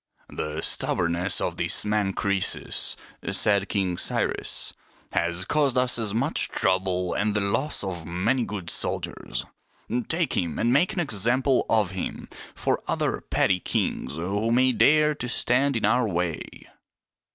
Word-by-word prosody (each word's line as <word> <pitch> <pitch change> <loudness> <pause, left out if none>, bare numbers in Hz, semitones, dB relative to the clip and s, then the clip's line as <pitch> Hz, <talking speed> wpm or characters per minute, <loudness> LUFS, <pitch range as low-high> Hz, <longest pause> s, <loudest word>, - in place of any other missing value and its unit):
" - - -35
The 75 +1 -4
stubbornness 85 +2 0
of - - -2
this - - -1
man 105 -2 +1
Crcesus," 100 -1 0 0.3
said 100 -1 +2
King 95 -4 0
Cyrus, - - -2 0.2
" - - -29
has 85 +2 0
caused 140 0 +2
us 125 -1 +2
much 135 +9 0
trouble 95 -1 0
and 105 0 0
the - - +3
loss 100 +9 0
of 90 -4 -4
many 95 +10 0
good 100 -6 -5
soldiers. - - -3 0.6
Take 170 0 0
him 85 -3 -1
and 120 +2 +2
make 175 +10 +3
an 195 - -2
example 130 - +1
of 105 -4 +3
him 95 -1 -5 0.3
for - - 0
other - - 0
petty 95 -1 +2
kings 70 - -1
who 100 +7 -1
may 130 +2 +4
dare 150 +4 +4
to 125 -4 -4
stand 125 +3 +2
in 110 - +1
our 120 +2 +3
way." 85 -4 -1
105 Hz, 150 wpm, -26 LUFS, 90-125 Hz, 0.6 s, may